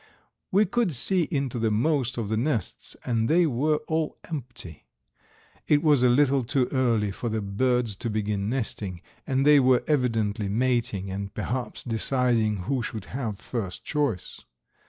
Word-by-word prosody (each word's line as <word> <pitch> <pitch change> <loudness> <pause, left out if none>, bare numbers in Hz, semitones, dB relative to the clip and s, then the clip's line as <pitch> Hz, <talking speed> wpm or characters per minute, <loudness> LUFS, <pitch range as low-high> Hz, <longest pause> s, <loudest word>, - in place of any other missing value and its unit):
We 205 +3 +4
could 235 - 0
see 180 +6 +1
into 135 -6 -2
the 115 -1 +1
most 125 +3 +1
of 115 -3 -2
the 110 - -1
nests, 120 0 -2
and 115 -2 0
they 170 +2 +4
were 150 +2 +1
all 160 -1 -1
empty. 120 - -7 0.8
It 150 +1 +3
was 150 -5 +4
a 125 - +5
little 135 +1 +3
too 125 +1 +1
early 115 -6 +1
for 120 +4 -4
the 110 0 -1
birds 115 +2 0
to 115 - -3
begin 105 -1 -1
nesting, 105 -8 -3 0.2
and 135 +1 +1
they 150 -1 +7
were 130 -1 +4
evidently 115 -8 0
mating 115 -4 0
and 100 +1 -4
perhaps 120 +3 -4
deciding 115 -4 +1
who 130 +4 -1
should 110 -2 -5
have 115 -6 -3
first 110 -6 -5
choice. 145 - -2
120 Hz, 155 wpm, -26 LUFS, 110-140 Hz, 0.8 s, they